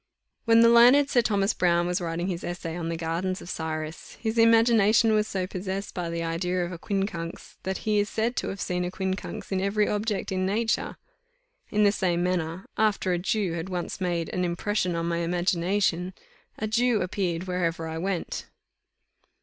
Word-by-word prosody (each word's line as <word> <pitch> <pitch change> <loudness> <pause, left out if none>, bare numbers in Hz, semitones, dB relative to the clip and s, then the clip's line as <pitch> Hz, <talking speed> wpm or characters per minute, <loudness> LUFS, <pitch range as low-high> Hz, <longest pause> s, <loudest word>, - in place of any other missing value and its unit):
When 230 -1 +6
the 230 - +7
learned 250 +5 +6
Sir 245 - +5
Thomas 205 -2 +1
Browne 175 -1 +2
was 180 +2 -1
writing 170 0 -2
his 180 -3 -3
Essay 165 -2 -4
on 170 -1 -3
the 165 - -2
Gardens 170 +3 -2
of 175 - -8
Cyrus, 155 0 -5
his 225 0 -1
imagination 225 -1 +5
was 215 0 +2
so 190 -3 -2
possessed 190 +1 -4
by 175 -2 -3
the 170 0 -3
idea 175 +2 -1
of 175 - -6
a 175 - -7
quincunx, 195 -4 -4
that 190 +1 -4
he 210 -1 +2
is 205 +1 0
said 230 +2 -1
to - - -1
have 195 - -5
seen 180 0 -1
a 180 - -2
quincunx 190 +2 -4
in 190 -1 0
every 205 +2 +1
object 210 -1 -1
in 185 0 0
nature. 220 +4 0 0.7
In 210 0 +2
the 205 - +5
same 175 -3 0
manner, 180 0 -2
after 205 -4 +2
a 175 - 0
Jew 195 -1 0
had 170 +2 -4
once 180 +1 -4
made 175 -2 -1
an 180 - -1
impression 180 +1 -1
on 165 0 -1
my 170 0 0
imagination, 180 +1 0 0.4
a 215 - -2
Jew 230 -1 +2
appeared 180 -2 -2
wherever 170 -3 -2
I 160 0 -4
went. 185 0 -3
185 Hz, 190 wpm, -26 LUFS, 170-210 Hz, 0.7 s, the